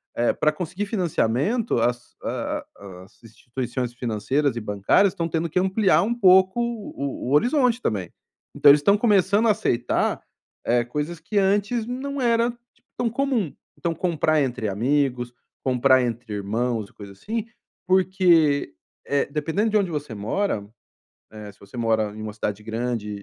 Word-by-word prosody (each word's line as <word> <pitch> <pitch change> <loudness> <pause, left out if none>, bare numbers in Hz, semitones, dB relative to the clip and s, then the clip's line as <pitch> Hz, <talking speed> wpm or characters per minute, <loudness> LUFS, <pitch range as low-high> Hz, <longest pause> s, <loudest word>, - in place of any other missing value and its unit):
eh, 120 - +2
para 155 - +2
conseguir 180 +5 -4
financiamento 185 - 0
as 120 +1 -2
a - - -3
a 95 -2 -11
as 95 - -22
instituições 120 +2 -5
financeiras 120 +3 -1
e 115 - -4
bancárias 105 - +2
estão 165 -1 -2
tendo 165 +1 -2
que 180 - +1
ampliar 190 +2 +3
um 230 - 0
pouco 190 0 +5
o 205 - -4
o - - -3
horizonte 245 - +3
também. 95 -6 -2 0.4
Então 145 - +6
eles 145 +1 +7
estão 200 +6 +4
começando 205 0 +3
a - - +6
aceitar, 120 - 0 0.4
eh, 120 0 +2
coisas 150 +7 -4
que 205 +5 -4
antes 205 +4 +1
não 275 +2 -4
era 235 0 +2 0.4
tão 240 -2 0
comum. 245 - -1 0.3
Então, 170 -1 -2
comprar 155 -2 +1
entre 120 -4 -2
amigos, 125 +2 0 0.3
comprar 130 0 +4
entre 115 -2 -4
irmãos 110 +2 -2
e - - -25
coisa 100 -1 -11
assim, 215 - -4 0.4
porque, 175 - +3 0.3
eh, 140 0 +1
dependendo 165 +9 0
de 215 - +3
onde 195 -4 +1
você 145 -6 -4
mora, 110 - -2 0.7
eh, 105 -1 -9
se - - -29
você 100 +4 -13
mora 110 -3 0
em 110 - -7
um 110 -1 -5
cidade 105 0 -4
grande 115 -1 -3
150 Hz, 160 wpm, -23 LUFS, -, 0.7 s, eles